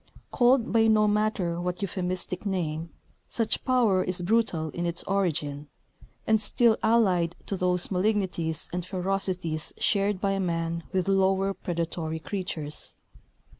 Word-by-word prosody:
Called 245 Hz, -1 st, +3 dB
by 225 Hz, -1 st, +5 dB
no 215 Hz, -1 st, +4 dB
matter 205 Hz, -5 st, 0 dB
what 180 Hz, +2 st, -3 dB
euphemistic 185 Hz, -1 st, -2 dB
name, 170 Hz, -5 st, -2 dB, 0.4 s
such 230 Hz, -2 st, 0 dB
power 235 Hz, -8 st, +3 dB
is 180 Hz, -1 st, -2 dB
brutal 180 Hz, -6 st, +1 dB
in 175 Hz, 0 st, -2 dB
its 170 Hz, 0 st, -2 dB
origin, 150 Hz, -7 st, -1 dB, 0.6 s
and 220 Hz, -1 st, +3 dB
still 225 Hz, +2 st, +4 dB
allied 185 Hz, -7 st, +3 dB
to 200 Hz, -, -3 dB
those 180 Hz, 0 st, 0 dB
malignities 185 Hz, -5 st, 0 dB
and 180 Hz, 0 st, -2 dB
ferocities 185 Hz, -3 st, -2 dB
shared 200 Hz, -1 st, +1 dB
by 195 Hz, 0 st, 0 dB
man 170 Hz, -2 st, -1 dB
with 185 Hz, -1 st, 0 dB
lower 195 Hz, 0 st, +2 dB
predatory 165 Hz, -3 st, -3 dB
creatures. 160 Hz, -4 st, -5 dB
185 Hz, 130 wpm, -27 LUFS, 170-205 Hz, 0.6 s, by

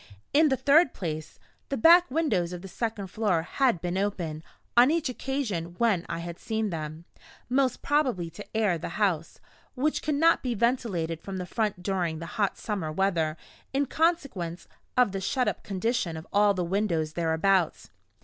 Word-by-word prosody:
In 305 Hz, +2 st, +5 dB
the 265 Hz, -, +1 dB
third 285 Hz, +2 st, +4 dB
place, 155 Hz, -4 st, -5 dB, 0.3 s
the 275 Hz, -, -1 dB
back 345 Hz, +8 st, +7 dB
windows 215 Hz, -, 0 dB
of 180 Hz, +1 st, -7 dB
the -, -, -7 dB
second 215 Hz, +1 st, -3 dB
floor 185 Hz, -4 st, 0 dB
had 245 Hz, +1 st, +1 dB
been 180 Hz, +1 st, -1 dB
open, 175 Hz, -6 st, -2 dB, 0.3 s
on 240 Hz, +2 st, +7 dB
each 320 Hz, -3 st, +1 dB
occasion 220 Hz, -11 st, -3 dB
when 215 Hz, -7 st, +1 dB
I 170 Hz, -, -2 dB
had 170 Hz, 0 st, -6 dB
seen 220 Hz, -2 st, -2 dB
them 155 Hz, 0 st, -5 dB, 0.4 s
most 260 Hz, 0 st, +1 dB
probably 255 Hz, -, +1 dB
to 205 Hz, +3 st, -8 dB
air 200 Hz, -7 st, +2 dB
the 170 Hz, -, -6 dB
house, 180 Hz, -6 st, 0 dB, 0.4 s
which 295 Hz, +4 st, 0 dB
could 300 Hz, -, -1 dB
not 330 Hz, +3 st, +4 dB
be 245 Hz, -2 st, -2 dB
ventilated 195 Hz, -9 st, 0 dB
from 195 Hz, +2 st, -6 dB
the 180 Hz, -, -4 dB
front 205 Hz, -1 st, -2 dB
during 180 Hz, -4 st, -1 dB
the 165 Hz, -, -6 dB, 0.2 s
hot 200 Hz, -, +1 dB
summer 195 Hz, -8 st, -3 dB
weather, 165 Hz, -3 st, 0 dB, 0.4 s
in 280 Hz, +1 st, +2 dB
consequence 275 Hz, -, -1 dB, 0.3 s
of 250 Hz, -5 st, +4 dB
the 195 Hz, 0 st, -3 dB
shut 255 Hz, +6 st, 0 dB
up -, -, -1 dB
condition 195 Hz, -4 st, -1 dB
of 160 Hz, -, -8 dB
all 205 Hz, 0 st, +4 dB
the 180 Hz, -, -1 dB
windows 170 Hz, -4 st, 0 dB
thereabouts. 170 Hz, +2 st, +1 dB
195 Hz, 175 wpm, -27 LUFS, 170-250 Hz, 0.4 s, back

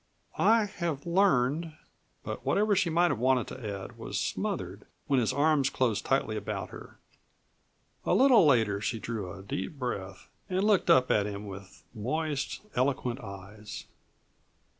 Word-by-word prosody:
"I 225 Hz, -1 st, +5 dB
have 170 Hz, -7 st, -4 dB
learned 165 Hz, -4 st, +2 dB, 0.3 s
" -, -, -42 dB
But -, -, -5 dB
whatever 210 Hz, 0 st, +2 dB
she 185 Hz, -2 st, +2 dB
might 170 Hz, +2 st, +3 dB
have 130 Hz, -, -2 dB
wanted 130 Hz, -1 st, +3 dB
to 105 Hz, -6 st, -5 dB
add -, -, -11 dB
was -, -, -3 dB
smothered -, -, -3 dB, 0.2 s
when 135 Hz, -2 st, +2 dB
his 115 Hz, -4 st, +1 dB
arms 145 Hz, -2 st, +3 dB
closed 120 Hz, -7 st, 0 dB
tightly -, -, +1 dB
about -, -, -4 dB
her. -, -, -11 dB, 1.1 s
A -, -, +2 dB
little 255 Hz, 0 st, +6 dB
later 110 Hz, -9 st, +3 dB
she 115 Hz, -, -1 dB
drew 110 Hz, -5 st, -4 dB
a 95 Hz, -, -10 dB
deep 95 Hz, -, -4 dB
breath 100 Hz, -8 st, -5 dB, 0.2 s
and 185 Hz, +1 st, 0 dB
looked 210 Hz, -2 st, +3 dB
up 130 Hz, 0 st, +5 dB
at 105 Hz, -1 st, +2 dB
him 100 Hz, 0 st, -6 dB
with 100 Hz, -1 st, -10 dB
moist, 140 Hz, +6 st, -2 dB
eloquent 130 Hz, -1 st, 0 dB
eyes. 100 Hz, 0 st, -9 dB
130 Hz, 155 wpm, -29 LUFS, 105-165 Hz, 1.1 s, little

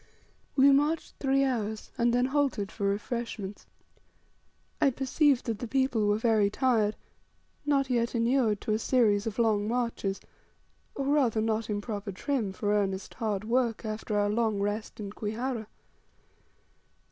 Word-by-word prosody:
We 275 Hz, +1 st, +6 dB
marched 295 Hz, +4 st, +1 dB
three 275 Hz, 0 st, +2 dB
hours, 220 Hz, -5 st, -2 dB
and 235 Hz, 0 st, +2 dB
then 245 Hz, +1 st, +2 dB
halted 265 Hz, -7 st, 0 dB
for 200 Hz, -2 st, -2 dB
refreshments. 205 Hz, -1 st, -4 dB, 1.1 s
I 280 Hz, -, +6 dB
perceived 270 Hz, +1 st, +2 dB
that 225 Hz, -3 st, -2 dB
the 240 Hz, -, -4 dB
people 255 Hz, -4 st, +1 dB
were 205 Hz, 0 st, +3 dB
very 220 Hz, -3 st, +3 dB
tired, 220 Hz, -3 st, +1 dB, 0.7 s
not 275 Hz, -2 st, +2 dB
yet 240 Hz, -1 st, 0 dB
inured 230 Hz, -2 st, +2 dB
to 215 Hz, -, -1 dB
a 215 Hz, -, +1 dB
series 225 Hz, -4 st, +2 dB
of 215 Hz, -, -4 dB
long 215 Hz, -3 st, +2 dB
marches, 230 Hz, -4 st, -1 dB, 0.8 s
or 275 Hz, -, -2 dB
rather, 270 Hz, -6 st, +2 dB
not 220 Hz, 0 st, -1 dB
in 205 Hz, -1 st, -1 dB
proper 205 Hz, -2 st, -5 dB
trim 225 Hz, +1 st, -2 dB
for 205 Hz, +2 st, -1 dB
earnest, 195 Hz, -2 st, -1 dB
hard 210 Hz, -3 st, -2 dB
work 235 Hz, 0 st, 0 dB
after 215 Hz, 0 st, -3 dB
our 205 Hz, 0 st, +2 dB
long 220 Hz, -2 st, +1 dB
rest 205 Hz, +3 st, -3 dB
in 200 Hz, -2 st, -5 dB
Kwihara. 220 Hz, +2 st, -3 dB
225 Hz, 145 wpm, -29 LUFS, 210-255 Hz, 1.1 s, We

